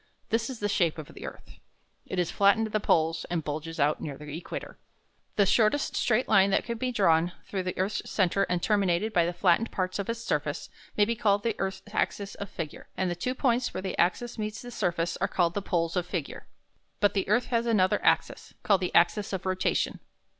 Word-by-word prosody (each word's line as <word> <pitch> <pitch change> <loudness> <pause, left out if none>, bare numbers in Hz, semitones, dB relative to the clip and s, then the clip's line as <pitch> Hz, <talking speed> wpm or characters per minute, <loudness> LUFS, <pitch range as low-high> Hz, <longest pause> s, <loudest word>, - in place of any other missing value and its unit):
This 230 +2 0
is 255 -4 -6
the 205 - 0
shape 175 -6 +1
of 155 - -8
the - - -8
earth. - - -12 0.5
It 185 - -4
is 175 -2 +1
flattened 200 +3 +4
at 215 - -7
the 215 - +2
poles 165 -4 +2
and 170 -2 -1
bulges 155 +2 -5
out 145 +2 +2
near 140 -3 -5
the 150 0 -8
equator. 170 - -7 0.6
The 200 - +4
shortest 215 +8 +2
straight 240 +2 +2
line 195 -2 +5
that - - +2
can 235 -1 -4
be 255 +1 -1
drawn 175 -6 +3
through 195 - -3
the 185 0 -4
earth's 190 +3 -2
centre 195 0 +1
and 175 -1 0
terminated 200 0 +1
by 170 -1 +3
the - - 0
flattened 180 +5 +2
parts 185 +1 -2
of 200 - -3
its 230 0 -2
surface 230 - -2 0.3
may 205 - +5
be 230 +2 -1
called 205 -3 +2
the 230 -2 0
earth's 190 0 -3
axis 200 -2 -1
of 200 - -7
figure; 155 -3 -7
and 185 -1 0
the - - -2
two 250 +9 -2
points 245 -2 +1
where - - -2
this 190 - -3
axis 220 +7 +1
meets 215 0 -4
the 245 - -8
surface 170 -6 -1
are - - 0
called 170 -2 +1
the 205 - -2
poles 170 -3 -1
of 180 -1 -1
figure. 175 -6 -5 0.5
But 205 - +3
the 195 -1 -1
earth 240 +4 +3
has 235 0 +2
another 190 -5 +2
axis, - - +1
called 200 -3 +3
the 180 - -2
axis 195 +4 +3
of 190 0 -3
rotation. 185 0 0
195 Hz, 220 wpm, -28 LUFS, 175-215 Hz, 0.6 s, line